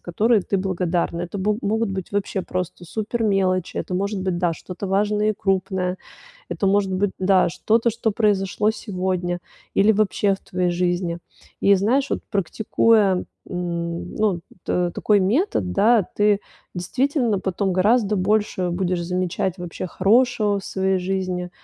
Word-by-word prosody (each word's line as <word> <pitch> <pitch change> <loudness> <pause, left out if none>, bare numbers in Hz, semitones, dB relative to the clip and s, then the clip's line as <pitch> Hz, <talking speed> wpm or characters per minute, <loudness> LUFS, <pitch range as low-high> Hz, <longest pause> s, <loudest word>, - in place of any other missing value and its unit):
которые 210 +5 +2
ты 200 - -1
благодарна. 180 -2 -1
Это 175 +3 -5
бо 205 +2 +1
могут 220 0 0
быть 190 0 -5
вообще 200 -1 -1
просто 180 -1 -4
супер 220 +5 -3
мелочи, 185 -3 +1
это 180 - -3
может 200 +2 -1
быть, 185 -2 -1
да, 175 -2 +1
что-то 180 +4 -7
важное 210 +2 +1
и - - -2
крупное. 190 -1 -1 0.5
Это 200 - -2
может 195 -1 +2
быть, 190 +2 +1
да, 185 -1 +3
что-то, 220 +6 +1
что 225 -1 -1
произошло 210 -1 +1
сегодня 185 -4 -2 0.3
или 205 +2 +4
вообще 205 -1 +2
в 195 - -12
твоей 180 -2 -1
жизни. 175 -1 -1 0.4
И 200 - +5
знаешь, 250 +9 +1
вот - - -1
практикуя, 205 0 +2 0.2
м, 170 -1 -4
ну, 205 -5 +1 0.2
т 180 -1 0
такой 210 -2 +3
метод, 195 - +1
да, 225 - +4
ты 205 -1 +3 0.3
действительно 245 - 0
потом 190 0 -1
гораздо 210 +3 +3
больше 195 -1 +1
будешь 180 0 -1
замечать 180 +1 -1
вообще 175 +1 -5
хорошего 210 +2 +2
в - - -13
своей 190 0 0
жизни. 185 -1 -2
195 Hz, 150 wpm, -22 LUFS, 180-210 Hz, 0.5 s, И